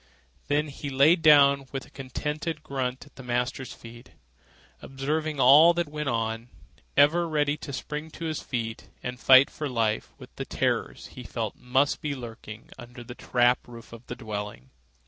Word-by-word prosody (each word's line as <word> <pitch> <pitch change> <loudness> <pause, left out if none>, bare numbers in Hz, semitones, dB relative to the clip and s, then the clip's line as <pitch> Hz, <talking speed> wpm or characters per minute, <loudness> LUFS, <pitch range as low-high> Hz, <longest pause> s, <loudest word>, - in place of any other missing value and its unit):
Then 145 +2 0
he 140 +1 -6
lay 140 +5 +5
down 140 -4 +5
with 135 -1 -5
a - - -20
contented 150 +4 -4
grunt 130 -3 -3
at 145 - -22
the - - -9
master's 125 +1 -2
feet, 120 +1 -13 0.7
observing 150 +3 -3
all 150 +7 +7
that 175 -2 -1
went 150 -1 -3
on, 115 0 -2 0.5
ever 165 +4 +4
ready 145 -2 +1
to 140 - -8
spring 150 +4 -5
to 165 - -7
his 155 -2 -3
feet 115 -3 -5
and 125 0 -5
fight 130 +1 +7
for 150 -2 -4
life 115 -3 -1
with - - -14
the - - -4
terrors - - -2
he - - -9
felt - - -4
must 130 +3 0
lurk 125 -6 -6 0.3
under 120 0 -10
the 120 - -9
trap 125 0 +1
roof 115 -1 -12
of 115 +1 -13
the - - -5
dwelling. 105 - -7
135 Hz, 165 wpm, -26 LUFS, 120-150 Hz, 0.7 s, all